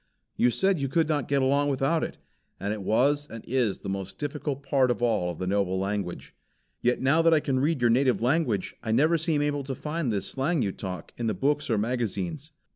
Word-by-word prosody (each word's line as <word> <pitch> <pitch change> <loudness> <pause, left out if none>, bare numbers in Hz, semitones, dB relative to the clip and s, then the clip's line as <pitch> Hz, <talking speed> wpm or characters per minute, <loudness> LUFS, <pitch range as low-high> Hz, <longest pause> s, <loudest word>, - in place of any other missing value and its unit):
You 125 - +3
said 190 +7 +2
you 140 - -1
could 160 +3 +1
not 150 -5 0
get 140 -1 +2
along 140 +2 +2
without 140 +4 +1
it. - - -5 0.4
And 100 +2 -2
it 105 - -5
was 140 +9 +2
and 115 -1 -9
is 120 -6 0
the - - -7
most 95 0 -4
difficult 145 -1 -4
part 135 -2 +2
of 120 0 -1
all 90 -7 +1
the 95 - -4
noble 95 -1 0
language. 95 -2 -3 0.5
Yet 125 +1 +2
now 140 +5 +4
that 165 0 +5
I - - +4
can 135 -3 0
read 145 0 +1
your 120 -1 +4
native 130 +1 +3
language, 125 - 0
I 110 - -3
never 150 +9 +4
seem 155 -2 +1
able 145 -1 -1
to 135 0 -4
find 150 -1 -2
this 100 -3 -2
slang 140 +2 0
you 100 - 0
talk 90 -4 -7
in 120 - -2
the 110 - 0
books 145 +9 0
or 110 - +2
magazines. 115 - -2
130 Hz, 220 wpm, -27 LUFS, 105-145 Hz, 0.5 s, that